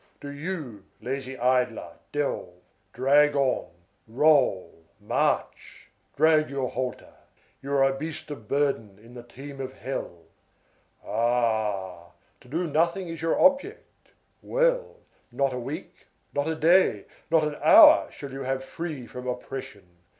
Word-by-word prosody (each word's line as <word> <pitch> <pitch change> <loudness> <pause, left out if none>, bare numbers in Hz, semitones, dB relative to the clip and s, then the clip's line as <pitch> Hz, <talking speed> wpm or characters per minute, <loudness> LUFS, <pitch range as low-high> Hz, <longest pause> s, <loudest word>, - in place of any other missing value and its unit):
Do 145 - -8
you, 145 - -6
lazy 130 +2 -5
idler, 125 -8 0
delve, 140 -11 -3 0.4
drag 145 +5 +3
on, 135 -2 0 0.4
roll, 120 - +2 0.2
march! - - -2 0.2
Drag 155 0 +4
your 135 -2 -3
halter. 125 0 -5 0.5
You 140 +1 -5
are 140 -1 +4
a 135 0 +2
beast 155 +1 -6
of 110 -7 -9
burden 135 -8 -1
in 115 +3 -17
the 120 - -9
team 135 +3 -10
of 130 0 -6
hell! 110 -11 -6 0.8
Ah! 105 -7 -1 0.3
To - - -20
do 165 +7 -2
nothing 170 +4 0
is 165 -1 -7
your 165 0 0
object. 280 +11 +1 0.3
Well, - - 0 0.3
not 135 -2 0
a 125 - -3
week, 120 - -8 0.3
not 145 +1 -1
a 160 - -1
day, 160 - +3 0.2
not 160 -1 +4
an 150 -1 -2
hour 315 0 +8
shall 140 -2 -9
you 135 - -6
have 130 0 -2
free 150 -2 -6
from 125 +1 -9
oppression. 125 -3 -6
135 Hz, 135 wpm, -26 LUFS, 120-155 Hz, 0.8 s, hour